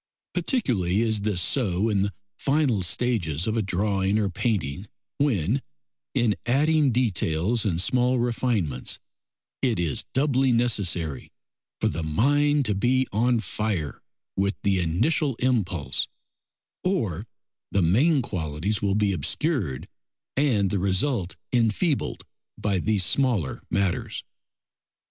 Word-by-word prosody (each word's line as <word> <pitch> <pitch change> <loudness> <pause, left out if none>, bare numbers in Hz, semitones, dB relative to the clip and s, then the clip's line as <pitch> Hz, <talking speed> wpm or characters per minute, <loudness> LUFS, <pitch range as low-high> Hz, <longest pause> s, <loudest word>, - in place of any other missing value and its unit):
Particularly 110 - +1
is 110 -2 +1
this 100 -4 0
so 105 -6 +1
in 105 -3 +1
the 100 0 -1 0.2
final 135 -5 +1
stages 90 - 0
of 110 - 0
a 115 - +2
drawing 100 0 0
or 100 -3 0
painting, 95 - -2 0.3
when, 130 - +1 0.5
in 120 -5 +2
adding 145 +2 +3
details 110 -2 +1
and 85 -5 0
small 125 +6 +2
refinements, 115 - 0 0.6
it 125 -6 +1
is 85 -5 0
doubly 135 -1 +3
necessary 95 - 0 0.5
for - - +2
the 85 - -2
mind 145 - +2
to 105 - +1
be 125 +6 +2
on 115 +2 +2
fire 100 - -3 0.3
with 100 +1 +1
the 100 -3 +2
initial 125 - +1
impulse, 100 - 0 0.8
or 115 - -1 0.4
the 100 - +1
main 130 - +3
qualities 90 +1 -2
will 100 -1 +1
be 105 -2 +2
obscured 95 - -1 0.5
and 115 -9 +2
the 100 - 0
result 95 +1 0 0.2
enfeebled 125 - +1 0.3
by 100 -3 0
these 105 -1 +1
smaller 120 - +1
matters. 100 -2 -1
105 Hz, 120 wpm, -25 LUFS, 90-125 Hz, 0.8 s, adding